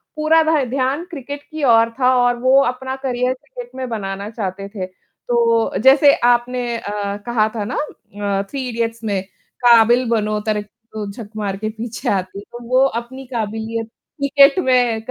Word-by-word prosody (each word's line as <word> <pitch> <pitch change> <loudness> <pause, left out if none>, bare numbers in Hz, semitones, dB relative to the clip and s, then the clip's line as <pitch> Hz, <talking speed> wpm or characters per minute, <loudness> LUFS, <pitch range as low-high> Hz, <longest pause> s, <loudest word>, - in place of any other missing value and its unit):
पूरा 310 +1 +4
भा 315 -3 +2
ध्यान 270 +5 -1
क्रिकेट 285 -1 -7
की 310 -1 -5
ओर 230 -2 +5
था 255 0 +4
और 245 0 +2
वो 260 +2 +5
अपना 260 +2 -3
करियर 250 -1 0
क्रिकेट 255 -2 -11
में 260 -1 -4
बनाना 200 -2 -4
चाहते 195 -3 -5
थे। 200 -3 -5
तो 230 +3 -1
जैसे 280 +2 +7 0.2
आपने 245 +1 +1
अ, - - -8 0.4
कहा 225 -3 +2
था 210 - -2
ना 250 - -4 0.6
अ, - - -1
थ्री 270 -2 -4
इडियट्स 230 -1 -3
में 200 -3 -1 0.4
काबिल 240 +1 +6
बनो 215 -2 0
तरक्की 210 -1 -2 0.2
तो 210 -2 -4
झक 210 0 -9
मार 200 -2 -2
के 215 +1 -3
पीछे 225 +1 -5
आती। 190 0 -2
तो 240 0 -9
वो 255 +1 +4 0.2
अपनी 260 +3 -11
काबिलियत 225 0 -3 0.3
क्रिकेट 280 +3 +5
में 245 -6 +2
240 Hz, 165 wpm, -19 LUFS, 215-260 Hz, 0.6 s, जैसे